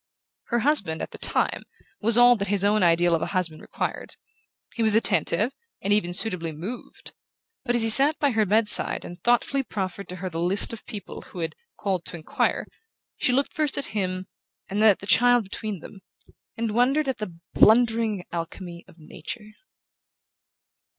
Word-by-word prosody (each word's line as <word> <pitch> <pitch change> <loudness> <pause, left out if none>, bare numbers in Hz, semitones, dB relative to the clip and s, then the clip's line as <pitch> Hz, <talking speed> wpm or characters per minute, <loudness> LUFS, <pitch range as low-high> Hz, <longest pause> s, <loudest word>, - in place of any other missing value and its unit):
Her 240 -1 -1
husband, 210 - +1
at - - -7
the - - -11
time, - - -1 0.4
was 230 +1 +3
all 245 0 +6
that 200 0 -3
his 200 -1 0
own 210 +1 +2
ideal 175 0 +3
of 165 - 0
a - - -2
husband 165 -4 -2
required. - - -5 0.6
He 235 - -4
was 220 -1 +3
attentive, 220 0 +2 0.3
and 200 +2 0
even 205 -4 0
suitably 180 -3 +2
moved: 185 +11 -9 0.5
but 245 - 0
as 235 - +2
he 225 - +2
sat 285 +6 +8
by 285 -2 +1
her 220 -2 +1
bedside, 210 +1 +4
and 175 +1 -11
thoughtfully 245 +3 +1
proffered 200 -5 -6
to 180 - -7
her 185 +1 -6
the 165 -2 -5
list 185 +6 +1
of 225 - -10
people 205 -5 -9
who 180 - -12
had 165 - -4 0.2
"called 190 -4 -2
to - - -8
enquire", 160 -2 -2 0.5
she - - +1
looked 275 +3 0
first 300 -3 -1
at 280 - -3
him, 185 -3 -3 0.4
and 205 +2 -3
then 220 - +6
at 200 - +2
the - - -8
child 245 +2 +4
between 200 -1 -6
them, 195 - -12 0.6
and 225 -1 -2
wondered 265 +6 +1
at 265 -4 -3
the 185 -6 -7 0.2
blundering 225 -3 +3
alchemy 170 +1 -7
of - - -19
Nature... 210 +7 -10
210 Hz, 180 wpm, -24 LUFS, 180-235 Hz, 0.6 s, sat